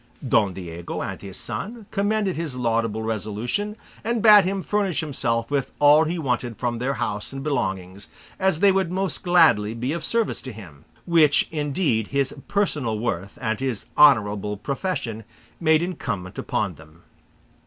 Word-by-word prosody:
Don 100 -5 +3
Diego 85 -2 -6
and - - -6
his 95 -2 -9
son 225 +1 -6
commended 205 -1 0
his 160 -5 -4
laudable 115 -3 0
resolution, 115 - -2 0.3
and 230 0 -1
bade 210 -3 +8
him 190 0 -2
furnish 200 -4 0
himself 120 -6 -2
with 140 -2 0
all 150 +2 +6
he 170 +3 -2
wanted 125 -6 -2
from 120 -2 -2
their 135 +3 -1
house 105 -2 -3
and 135 0 -6
belongings, 95 -9 -3 0.3
as 190 -4 +1
they 200 -1 +6
would 190 -3 0
most 190 +1 -2
gladly 160 - +4
be 125 +5 -2
of 170 - -4
service 230 -2 0
to 130 - -7
him; 90 - -13 0.2
which, 160 -4 +4
indeed, 145 - 0
his 140 -1 0
personal 150 - 0
worth 100 -4 -3
and 110 -1 -2
his 130 -6 -3
honourable 105 -7 +4
profession 135 - -3 0.4
made 160 -1 +3
incumbent 105 - -4
upon 100 -4 -1
them. 80 +1 -18
135 Hz, 155 wpm, -23 LUFS, 110-175 Hz, 0.4 s, bade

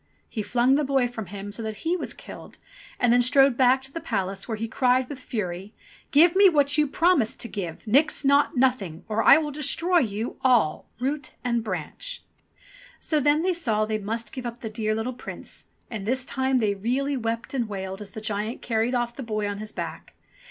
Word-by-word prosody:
He 220 - -4
flung 240 +5 +2
the 295 +2 +3
boy 270 -2 +2
from 225 -5 -7
him 200 +1 -7
so 220 - -5
that 220 -1 -4
he 340 +2 +2
was 365 - -4
killed, - - -11 0.4
and 245 -1 +4
then 245 - +5
strode 270 +1 +5
back 260 +1 +4
to 270 - -11
the 330 - -6
palace, 195 -3 -3
where 225 -2 -3
he 225 +2 -3
cried 250 +2 +2
with 280 -2 -7
fury: 195 -5 -5 0.3
"Give 330 +4 +5
me 395 0 +7
what 290 -4 +3
you 300 0 +3
promised 330 -7 +2
to - - -3
give, 185 -5 -6
Nix 285 +6 +2
Naught 280 0 +3
Nothing, 230 -11 0
or 220 0 0
I - - +8
will 305 -2 -2
destroy 305 +5 +2
you 220 -3 -3
all, 240 -12 +3
root 280 +4 -3
and 235 -2 0
branch." 220 - -5 0.8
So 310 - +1
then 295 +3 +3
they 370 0 +2
saw 225 -11 0
they 215 0 -2
must 215 +2 -4
give 255 -2 -5
up 235 0 -8
the 220 - -5
dear 215 -1 -1
little 225 +3 -2
Prince, 250 - -9 0.2
and 210 -3 -6
this 255 +1 0
time 265 -1 0
they 215 -4 +2
really 255 +8 -1
wept 230 -1 -3
and 240 -5 -1
wailed 190 0 -5
as 205 - -8
the 215 - -8
giant 215 +2 -3
carried 230 +2 0
off 240 -1 -1
the - - -6
boy 215 -4 -2
on 205 0 -4
his 215 0 -6
back. - - -7
240 Hz, 210 wpm, -25 LUFS, 215-275 Hz, 0.8 s, I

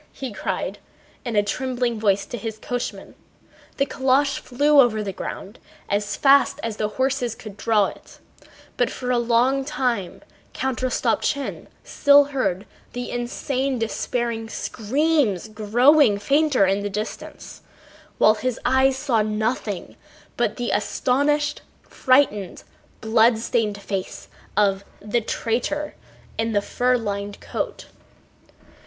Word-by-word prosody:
"Go - - -29
fas... - - -35
faster!" 270 - -5
he 245 - -5
cried 190 - -3 0.5
in 235 -2 -3
a 205 - +4
trembling 245 +1 -2
voice 200 -2 +2
to - - -6
his 225 -1 -5
coachman. 245 +2 -5 0.6
The 275 - +2
calèche 270 +1 +1
flew 290 +3 +3
over 220 -4 +1
the 195 -2 -4
ground 200 +4 -7 0.3
as 205 0 -1
fast 280 +1 +4
as 225 -2 -3
the 210 - 0
horses 260 -3 0
could 215 -3 -10
draw 210 0 +2
it, - - -10 0.6
but 245 -2 +2
for 250 -1 -4
a 245 - +2
long 245 +3 +2
time 250 -10 -2 0.3
Count 265 -3 -2
Rostopchín 265 +2 -1 0.2
still 285 0 +5
heard 195 -7 -1 0.3
the 245 0 -5
insane 255 +2 -2
despairing 230 0 -2
screams 245 - 0
growing 225 +3 +4
fainter 275 +1 +3
in 195 +1 +1
the 205 - -3
distance, 210 +2 -7 0.6
while 215 - +6
his 245 +2 -3
eyes 265 0 +3
saw 260 -5 +1
nothing 215 -2 -2 0.4
but - - 0
the 245 -1 -2
astonished, 290 +7 0 0.2
frightened, 255 -8 +1 0.4
bloodstained 220 -1 +2
face 195 -1 -5 0.3
of 200 -2 +2 0.2
"the 215 +3 -1
traitor" 250 +7 -2 0.5
in 225 0 0
the 205 - +2
fur 250 +3 +1
lined 200 -2 -4
coat. - - -5
235 Hz, 130 wpm, -23 LUFS, 210-265 Hz, 0.6 s, while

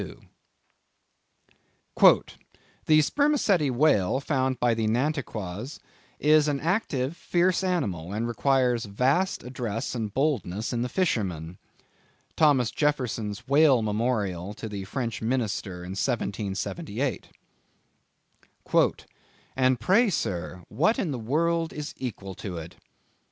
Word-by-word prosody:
"The 155 0 +6
Spermacetti 220 - +2
Whale 125 -5 +2
found 130 -2 -1
by 120 -1 +3
the 110 -1 -1
Nantuckois, 120 - -2 0.4
is 155 0 +4
an 145 -2 0
active, 155 - -1
fierce 175 +2 +1
animal, 100 - -1
and 110 +3 -2
requires 125 -1 +1
vast 130 - +1
address 120 -3 -4
and 110 -4 -3
boldness 115 - -1
in 120 - -1
the 125 - -2
fishermen." 90 - -1 0.8
—Thomas 135 -7 +3
Jefferson's 120 -8 -1
Whale 140 -4 +5
Memorial 105 -4 -1
to 110 - -6
the 100 -2 -6
French 115 +2 -4
minister 110 -6 -2
in 90 - -7
1778. 110 - -2 2.3
"And 130 -1 +2
pray, 200 - +4
sir, 90 - -3
what 170 - +1
in 170 - -1
the 130 - -3
world 165 +7 0
is 150 +1 -6
equal 100 -6 -6
to 90 -1 -6
it?" 80 +2 -8
125 Hz, 110 wpm, -26 LUFS, 105-150 Hz, 2.3 s, The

